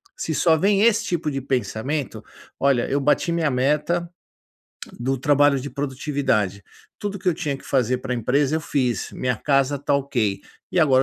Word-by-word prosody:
Se 160 - -3
só 165 +1 +4
vem 195 +4 +3
esse 225 -1 +4
tipo 170 -7 -1
de 135 -1 -3
pensamento: 130 +3 -2 0.4
"Olha, 135 -3 +2
eu 140 - 0
bati 150 +4 +2
minha 165 -3 +1
meta 150 +7 +1 0.9
do 135 +3 0
trabalho 145 +1 +3
de 140 +2 -6
produtividade. 130 -8 -1 0.4
Tudo 205 -2 -4
que 190 - -17
eu - - +4
tinha 145 -3 -2
que - - -16
fazer 125 -2 +1
para 125 0 -4
a - - -1
empresa 135 +6 +1
eu - - -2
fiz. 125 -9 -1
Minha 125 -1 -1
casa 140 +2 +1
está 140 +1 0
ok, 120 -8 0 0.3
e - - 0
agora 135 -5 +5
140 Hz, 180 wpm, -23 LUFS, 130-155 Hz, 0.9 s, agora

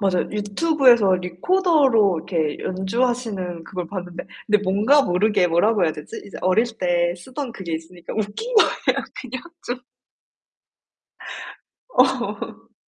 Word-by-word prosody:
맞아요. 190 -3 +1
유튜브에서 235 - +3
리코더로 230 - +2
이렇게 160 -3 -2
연주하시는 190 -3 -2
그걸 180 -1 -5
봤는데 180 -3 -6 0.2
근데 210 -1 +4
뭔가 210 +10 +4
모르게 195 -1 +2
뭐라고 200 +5 +2
해야 160 - +1
되지? 150 - -8
이제 200 - -9
어릴 185 +5 +3
때 175 -1 +1
쓰던 260 +8 -6
그게 185 -6 -6
있으니까 165 +2 -8
웃긴 220 - -3
거예요, 435 - +3 0.2
그냥 255 -1 -6 0.2
좀. 245 +1 -3 2.1
어. - - 0
200 Hz, 285 characters per minute, -22 LUFS, 180-245 Hz, 2.1 s, 근데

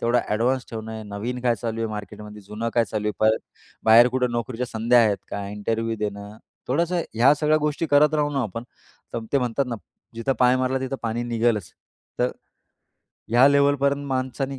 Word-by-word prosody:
तेवढं 120 +1 +2
एडव्हान्स 120 +4 +1
ठेवणं 110 -1 -6
आहे, 110 0 -6
नवीन 105 +5 -5
काय 120 -2 +3
चालू 115 -1 -3
आहे 115 - -1
मार्केटमध्ये, 105 0 -8
जुनं 105 +4 -4
काय 120 - +4
चालू 105 -1 -4
आहे, - - -1
परत 110 +1 +4 0.5
बाहेर 115 +2 +7
कुठे 125 0 0
नोकरीच्या 120 +1 -3
संध्या 115 +2 +2
आहेत 105 -2 +2
का, 100 -1 -4
इंटरव्ह्यू 115 +2 -2
देणं, 105 0 -5 0.3
थोडंसं 170 +6 +1
ह्या 125 +6 +5
सगळ्या 155 0 +3
गोष्टी 150 +2 -1
करत 150 +2 +5
राहू 150 -1 +1
ना 135 -2 0
आपण, 115 +1 -5 0.5
तर 115 -1 -4
ते 140 - +4
म्हणतात 125 +2 -1
ना, 120 - -3 0.4
जिथं 115 +4 -1
पाय 125 0 +5
मारला 130 +1 0
तिथं 130 +1 -3
पाणी 115 +1 -2
निघेलच, 115 -5 0 0.5
तर - - +2 1.0
ह्या 120 +4 +6
लेव्हलपर्यंत 140 0 +2
माणसाने 130 +1 -2
120 Hz, 180 wpm, -24 LUFS, 110-135 Hz, 1.0 s, बाहेर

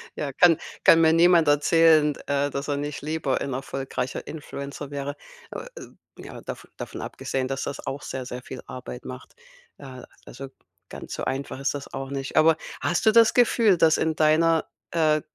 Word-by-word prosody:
Ja, 145 -2 -3
kann 165 +2 +5 0.3
kann 165 0 +7
mir 160 - +5
niemand 170 -1 +5
erzählen, 150 +1 +4
d - - -13
äh, 145 0 +1
dass 140 +1 -5
er 145 - 0
nicht 145 0 -4
lieber 150 -3 -2
ein 135 - -3
erfolgreicher 135 -1 -4
Influencer 140 -2 -7
wäre. 140 0 -4 0.4
Äh, - - -6 0.5
ja, - - -10
dav - - -8
davon - - -7
abgesehen, 130 -1 -3
dass 135 +1 -3
das 140 - -6
auch 140 +2 -4
sehr, 130 -1 -6
sehr 125 0 -7
viel 130 - -8
Arbeit 125 -1 -8
macht. 130 0 -10 0.4
Äh, 130 -2 -10 0.2
also 135 +2 -9 0.4
ganz - - -8
so - - -4
einfach 135 0 -4
ist 140 +1 -1
das 140 -1 -8
auch 135 0 -5
nicht. 135 +1 -5
Aber 160 0 +6 0.3
hast 175 - 0
du 220 - +6
das 230 0 +5
Gefühl, 230 -5 +4
dass 160 -1 +4
in 160 -1 0
deiner, 160 +1 +3 0.3
äh, 155 -2 +2
145 Hz, 185 wpm, -25 LUFS, 135-160 Hz, 0.5 s, kann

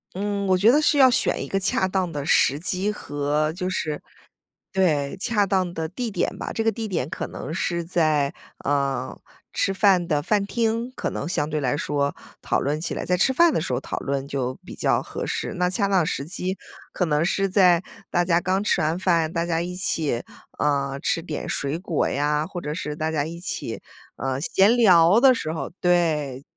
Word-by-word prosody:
嗯， 200 +1 -2
我 185 -1 +4
觉 200 +5 +5
得 300 - +4
是 300 - +3
要 265 -2 +7
选 245 - +1
一 - - -4
个 195 - -1
恰 190 0 +1
当 185 -2 -1
的 145 -3 -4
时 140 0 +3
机 185 +4 -1
和 150 -4 -1
就 180 +1 -3
是 155 -5 -2 0.7
对， 150 -7 +1
恰 210 -3 +2
当 185 -2 0
的 160 -2 -3
地 225 +7 -4
点 - - -1
吧， - - -5
这 225 - -2
个 225 - +4
地 225 0 -5
点 165 -8 -2
可 185 - -4
能 155 - -7
是 170 0 -1
在， 155 -5 +1 0.3
呃， 140 -3 -1 0.4
吃 195 - +1
饭 190 -3 +4
的 150 -1 +2
饭 200 +5 +1
厅， 230 +3 -1
可 - - -2
能 145 - -4
相 150 -5 -1
对 155 -1 -2
来 135 +1 0
说 145 -2 -1 0.3
讨 - - 0
论 145 +3 -1
起 - - -3
来 - - -4
在 180 - +2
吃 180 +9 +3
饭 335 +4 +5
的 - - 0
时 - - -3
候 - - 0
讨 - - -5
论 140 0 -3
就 130 -3 -2
比 - - -9
较 - - +1
合 - - -5
适， - - -3
那 180 0 +2
恰 200 +2 +1
当 190 -4 +3
时 140 -4 -2
机 185 +3 -3 0.3
可 180 - 0
能 150 -1 +1
是 195 +3 +1
在 180 -3 +4 0.3
大 175 -1 +1
家 170 -1 +2
刚 185 +2 0
吃 205 -4 +1
完 160 +3 0
饭， 170 -4 +2
大 170 0 -1
家 165 -1 0
一 180 +1 -4
起， 155 -8 -1 0.4
呃， 140 -2 0
吃 165 - 0
点 155 -2 -5
水 140 +2 -2
果 175 -4 -1
呀， 150 +2 0
或 180 +1 -6
者 150 -3 -4
是 150 -2 -5
大 160 0 -1
家 150 -2 0
一 170 +2 -7
起， 175 - -4 0.4
呃， 135 0 -2
闲 195 +7 +4
聊 190 -3 +6
的 265 -1 +7
时 160 -9 -3
候 160 - -4
对。 155 -7 +1
170 Hz, 225 characters per minute, -24 LUFS, 150-195 Hz, 0.7 s, 要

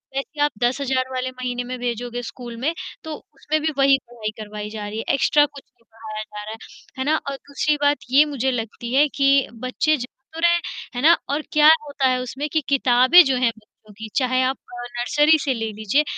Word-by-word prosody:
वैसे 275 - -2
ही 290 - -3
आप 295 - +2
10,000 260 +1 0
वाले 255 0 -2
महीने 250 -1 -4
में 255 +1 -5
भेजोगे 245 0 -3
स्कूल 240 0 -8
में, 305 +5 0 0.3
तो 315 -1 -5 0.2
उसमें 305 +2 -2
भी 315 +1 0
वही 275 0 +5
पढ़ाई 230 -3 -5
करवाई 210 0 -6
जा 210 -1 -6
रही 210 +1 -6
है, 225 - -3
एक्स्ट्रा 290 +2 +4
कुछ 280 -1 -12
नहीं 245 -2 -35
पढ़ाया 220 -1 -7
जा 210 -1 -9
रहा 215 - -7
है, - - -9 0.4
है - - 0
ना? 305 +2 +3
और 275 - -3
दूसरी 285 +2 -1
बात, 290 0 +3
ये 285 +3 +6
मुझे 265 -3 -1
लगती 235 0 -5
है 290 +2 +5
कि 275 -1 +4 0.2
बच्चे 280 +5 +1
जा 245 - -4 0.3
तो 325 - -7
रहे 340 +1 +4
हैं, 345 - +1 0.3
है 245 - -2
ना? 325 +4 +7 0.2
और 290 +2 0
क्या 300 0 +5 0.2
होता 285 -2 0
है 255 -1 +1
उसमें 265 +4 -4
कि 315 - +2
किताबें 260 +4 +6
जो 270 -1 +1
है 250 -1 +3
बच्चों 215 0 -21
की, 220 +2 -9
चाहे 255 -2 +2
आप 260 +1 0 0.4
नर्सरी 295 +6 +4
से 270 - +1
ले 225 -2 -3
लीजिए, 215 +8 +1
255 Hz, 225 wpm, -22 LUFS, 235-285 Hz, 0.4 s, ना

